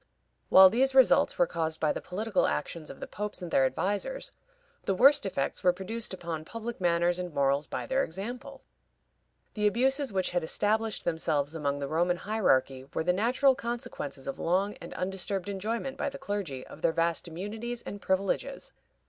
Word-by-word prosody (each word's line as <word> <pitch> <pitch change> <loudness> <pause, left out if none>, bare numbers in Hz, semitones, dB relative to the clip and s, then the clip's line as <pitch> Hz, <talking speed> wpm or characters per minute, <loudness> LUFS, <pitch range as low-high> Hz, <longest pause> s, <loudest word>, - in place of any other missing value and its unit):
While 190 0 +9
these 265 +3 +2
results 265 -2 +5
were 175 - +5
caused 160 -1 -2
by 155 - +2
the - - -5
political 205 +2 0
actions 155 +1 -3
of - - -10
the - - -5
popes 210 -1 -5
and 175 - -6
their 135 - +4
advisers, 205 - -2 0.5
the 195 - +1
worst 270 0 +6
effects 140 -8 -2
were 180 - +6
produced 205 +5 -5
upon 170 -4 -5
public 230 +4 -6
manners 175 0 +2
and 180 -1 -4
morals 140 0 +1
by - - -4
their 265 +1 +1
example. 245 +10 -7 0.9
The 210 0 +2
abuses 265 +5 +1
which 190 -2 0
had 175 -1 0
established 215 +6 0
themselves 160 -3 0
among 145 -3 -1
the 140 -1 -3
Roman 175 +4 +1
hierarchy 135 -12 +1
were - - 0
the 180 +2 +2
natural 250 +7 +3
consequences 235 - -5
of 135 - -4
long 190 +4 +1
and - - -8
undisturbed 190 0 -2
enjoyment 225 +7 -3
by - - -1
the - - -8
clergy 180 -11 -4
of 160 - -12
their 160 - +2
vast 170 +1 0
immunities 220 +8 -5
and 200 - -7
privileges. 190 +1 -1
190 Hz, 175 wpm, -29 LUFS, 165-225 Hz, 0.9 s, While